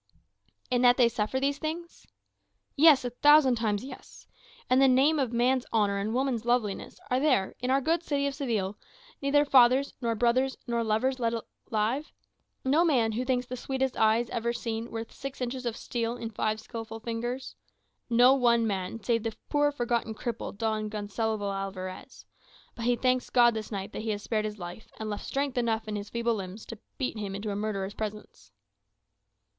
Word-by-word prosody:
"In 245 -1 +2
that 245 -1 +6
they 245 - +6
suffer 230 +2 -1
these 280 +1 0
things?" 335 +2 -6 0.7
"Yes; 295 -3 +6
a 245 - -2
thousand 295 +1 +6
times, 210 -2 0
yes. 260 -1 -11 0.4
In 255 +1 +4
the 270 - +6
name 275 +4 +4
of 260 -4 0
man's 250 +2 +1
honour 205 -3 +2
and 205 +2 -2
woman's 250 -2 0
loveliness, 235 -4 -1
are 250 - +3
there, 260 -10 +2
in 250 - -2
our 270 +1 +3
good 325 +5 +1
city 285 -4 -1
of 280 - -1
Seville, 220 -8 -2 0.4
neither 290 +1 +3
fathers, 260 0 +5
nor 230 -1 0
brothers, 245 +4 +2
nor 235 -2 0
lovers 230 +4 0
left 230 -1 0 0.4
alive? 225 +7 0 0.5
No 295 +6 +4
man 250 -10 +3
who 235 +4 -2
thinks 250 -1 0
the 255 - -5
sweetest 265 +1 -2
eyes 225 +2 +3
ever 235 0 -1
seen 230 0 -4
worth 225 0 -6
six 275 0 -7
inches 250 0 -3
of 230 - -3
steel 235 0 -3
in 230 -1 -5
five 215 0 -1
skilful 225 0 -7
fingers? 240 +3 -4 0.5
No 245 +2 +6
one 235 -3 +3
man, 200 +1 -3
save 230 0 +1
the 225 0 -4
poor 290 0 +3
forgotten 235 -4 -1
cripple, 235 -3 -5
Don 215 -1 -1
Gonsalvo 210 0 -2
Alvarez. 190 -1 -6 0.5
But 230 - -6
he 245 0 +3
thanks 255 0 +1
God 240 -1 +5
this 220 0 -5
night 195 -2 -4
that - - -5
he 220 - -4
has 205 -1 -2
spared 215 -2 -1
his 210 0 -4
life, 175 +3 -9
and 215 -1 -3
left 205 - -5
strength 275 -2 -1
enough 225 -2 -1
in 210 - -3
his 205 0 -5
feeble 235 +1 0
limbs 195 0 -6
to 230 - -9 0.2
bear 260 - -1
him 205 -3 -4
into 205 +1 -4
a - - -3
murderer's 205 -2 -3
presence." 210 - -7
235 Hz, 185 wpm, -28 LUFS, 215-260 Hz, 0.7 s, that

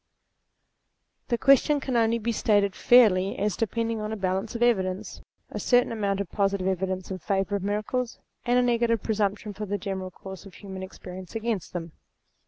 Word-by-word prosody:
The 240 - +1
question 275 +3 +4
can 265 -2 -3
only 230 0 +3
be 235 +1 -1
stated 205 -3 +2
fairly 200 -6 +5
as 205 -2 0
depending 230 0 -1
on 215 0 -3
a - - -2
balance 190 +3 -2
of 235 - +1
evidence: 190 -5 0 0.3
a - - -4
certain 245 -1 +3
amount 200 -3 -1
of 200 -4 -4
positive 200 -2 0
evidence 190 0 -2
in 185 - -4
favour 195 +2 -1
of - - -7
miracles, 215 +5 -2 0.3
and 245 0 +2
a 250 - +4
negative 235 -2 +1
presumption 210 -1 -1
from 210 0 -6
the 205 - 0
general 190 -2 -4
course 190 +1 -10
of 185 - -15
human 190 -2 -8
experience 185 0 -9
against 225 -5 -2
them. 170 -2 -5
205 Hz, 180 wpm, -26 LUFS, 190-230 Hz, 0.3 s, fairly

